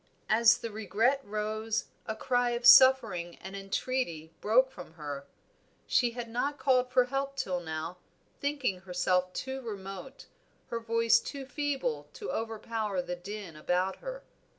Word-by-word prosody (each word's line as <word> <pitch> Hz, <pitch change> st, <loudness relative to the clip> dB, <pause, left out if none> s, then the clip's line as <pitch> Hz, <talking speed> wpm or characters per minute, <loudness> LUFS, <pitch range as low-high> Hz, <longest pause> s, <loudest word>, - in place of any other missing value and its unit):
As 230 Hz, +2 st, +6 dB
the 230 Hz, -2 st, -6 dB
regret 220 Hz, +6 st, +1 dB
rose, 215 Hz, +1 st, -2 dB, 0.2 s
a 220 Hz, -, -2 dB
cry 245 Hz, +1 st, +1 dB
of 240 Hz, -, -6 dB
suffering 235 Hz, -9 st, +7 dB
and 190 Hz, +1 st, -9 dB
entreaty 195 Hz, -5 st, -2 dB
broke 255 Hz, +5 st, +4 dB
from 180 Hz, -7 st, -11 dB
her. 145 Hz, -3 st, -6 dB, 0.6 s
She 245 Hz, -, +3 dB
had 240 Hz, -1 st, -5 dB
not 260 Hz, +5 st, -1 dB
called 255 Hz, -3 st, +2 dB
for 250 Hz, 0 st, +4 dB
help 275 Hz, +2 st, -2 dB
till 185 Hz, -9 st, -1 dB
now, 165 Hz, +1 st, -5 dB, 0.4 s
thinking 280 Hz, -10 st, -1 dB
herself 180 Hz, 0 st, 0 dB
too 265 Hz, +6 st, -4 dB
remote, 200 Hz, +2 st, -7 dB, 0.5 s
her 235 Hz, -, -1 dB
voice 230 Hz, 0 st, +3 dB
too 275 Hz, +3 st, -6 dB
feeble 290 Hz, -, -2 dB
to 420 Hz, -, -5 dB
overpower 225 Hz, -2 st, -2 dB
the 180 Hz, 0 st, -4 dB
din 190 Hz, -1 st, -8 dB
about 180 Hz, +5 st, 0 dB
her. -, -, -7 dB
225 Hz, 145 wpm, -30 LUFS, 185-255 Hz, 0.6 s, suffering